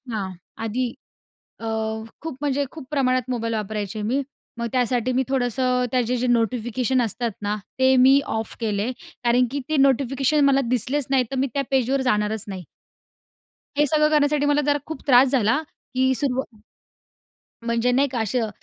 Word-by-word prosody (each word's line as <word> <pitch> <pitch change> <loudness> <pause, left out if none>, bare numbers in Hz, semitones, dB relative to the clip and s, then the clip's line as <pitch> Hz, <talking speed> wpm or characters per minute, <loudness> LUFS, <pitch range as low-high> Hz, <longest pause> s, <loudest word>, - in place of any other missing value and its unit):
हां. 200 -4 -3 0.3
आधी 240 +2 -1 0.7
अ, 225 - -5 0.5
खूप 320 -5 -6
म्हणजे 285 -1 0
खूप 310 -4 -10
प्रमाणात 255 -3 +1
मोबाईल 230 -2 -2
वापरायचे 215 0 -3
मी. 245 +7 0 0.4
मग 235 0 -2
त्यासाठी 250 -1 +1
मी 260 +1 +2
थोडंसं 250 -1 +1
त्याचे 250 -1 +1
जे 250 +1 -1
नोटिफिकेशन 240 +2 +1
असतात 235 +1 -1
ना, 205 0 -1 0.2
ते 260 0 +5
मी 265 +2 +6 0.2
ऑफ 220 - -4
केले. 215 +1 -1 0.3
कारण 245 +1 +3
की 285 - -2
ते 310 - +1
नोटिफिकेशन 275 +2 +3
मला 275 0 +4
दिसलेच 255 +3 0
नाहीतर, 265 -1 +1
मी 265 +1 +1
त्या 280 - 0
पेजवर 265 +1 +2
जाणारच 210 -1 0
नाही. 190 -2 -6 1.2
हे 295 - +5
सगळं 305 +1 +3
करण्यासाठी 295 -1 +2
मला 290 0 +3
जरा 290 0 +3
खूप 315 -4 -7
त्रास 260 0 +6
झाला, 245 0 +2 0.3
की 260 +1 +3
सुरव 260 -4 -1 1.1
म्हणजे 235 +1 +1
नाही 275 +3 +3
का 250 -3 -3
असं 225 +1 0
255 Hz, 160 wpm, -23 LUFS, 230-275 Hz, 1.2 s, मी